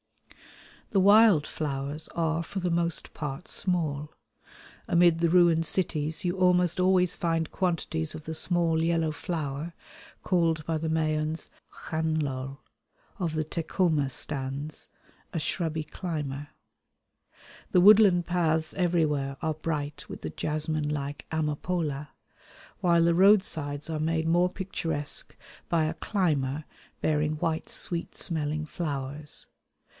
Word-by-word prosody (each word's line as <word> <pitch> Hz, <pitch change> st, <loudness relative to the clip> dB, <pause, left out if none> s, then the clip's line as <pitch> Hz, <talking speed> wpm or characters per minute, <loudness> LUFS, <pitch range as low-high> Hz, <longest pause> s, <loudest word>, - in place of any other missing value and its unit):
The 195 Hz, -, +2 dB
wild 200 Hz, -5 st, +6 dB
flowers 145 Hz, +1 st, -4 dB
are 165 Hz, 0 st, 0 dB
for 190 Hz, +4 st, -5 dB
the 180 Hz, -1 st, -1 dB
most 170 Hz, -1 st, 0 dB
part 150 Hz, +2 st, -5 dB
small. 155 Hz, -5 st, -1 dB, 0.8 s
Amid 170 Hz, -1 st, +4 dB
the 170 Hz, 0 st, +3 dB
ruined 170 Hz, -2 st, +4 dB
cities 160 Hz, 0 st, 0 dB
you 180 Hz, +2 st, 0 dB
almost 180 Hz, -1 st, +3 dB
always 180 Hz, -1 st, +3 dB
find 165 Hz, -2 st, -1 dB
quantities 165 Hz, -3 st, -1 dB
of 155 Hz, -, -9 dB
the 160 Hz, -, -4 dB
small 165 Hz, 0 st, +1 dB
yellow 165 Hz, -1 st, +1 dB
flower, 155 Hz, 0 st, -4 dB, 0.5 s
called 165 Hz, -4 st, +1 dB
by 165 Hz, -1 st, 0 dB
the 160 Hz, +1 st, -2 dB
Mayans 155 Hz, 0 st, -1 dB, 0.4 s
x̆canlol, 145 Hz, -4 st, -2 dB, 0.6 s
of 165 Hz, -4 st, -1 dB
the 155 Hz, 0 st, 0 dB
Tecoma 160 Hz, -3 st, 0 dB
stans, 140 Hz, +2 st, -2 dB, 0.4 s
a 165 Hz, -, -2 dB
shrubby 160 Hz, 0 st, -1 dB
climber. 150 Hz, -4 st, -5 dB, 1.2 s
The 180 Hz, -, +5 dB
woodland 195 Hz, -2 st, +7 dB
paths 160 Hz, -3 st, 0 dB
everywhere 155 Hz, -6 st, 0 dB
are 160 Hz, -1 st, 0 dB
bright 150 Hz, -2 st, -4 dB
with -, -, -8 dB
the 80 Hz, -, -5 dB
jasmine 155 Hz, -, -1 dB
like 145 Hz, -1 st, -4 dB
amapola; 150 Hz, -1 st, -2 dB, 0.7 s
while 170 Hz, -2 st, +4 dB
the 170 Hz, 0 st, +4 dB
roadsides 170 Hz, -7 st, +3 dB
are 155 Hz, -1 st, -2 dB
made 160 Hz, +1 st, 0 dB
more 175 Hz, +2 st, +3 dB
picturesque 165 Hz, -6 st, -3 dB, 0.3 s
by 165 Hz, -3 st, +2 dB
a 155 Hz, -, -1 dB
climber 155 Hz, -7 st, -1 dB, 0.4 s
bearing 150 Hz, 0 st, +1 dB
white 160 Hz, +1 st, -2 dB
sweet 170 Hz, -1 st, 0 dB
smelling 155 Hz, -3 st, -1 dB
flowers. 145 Hz, -2 st, -3 dB
160 Hz, 120 wpm, -28 LUFS, 150-175 Hz, 1.2 s, woodland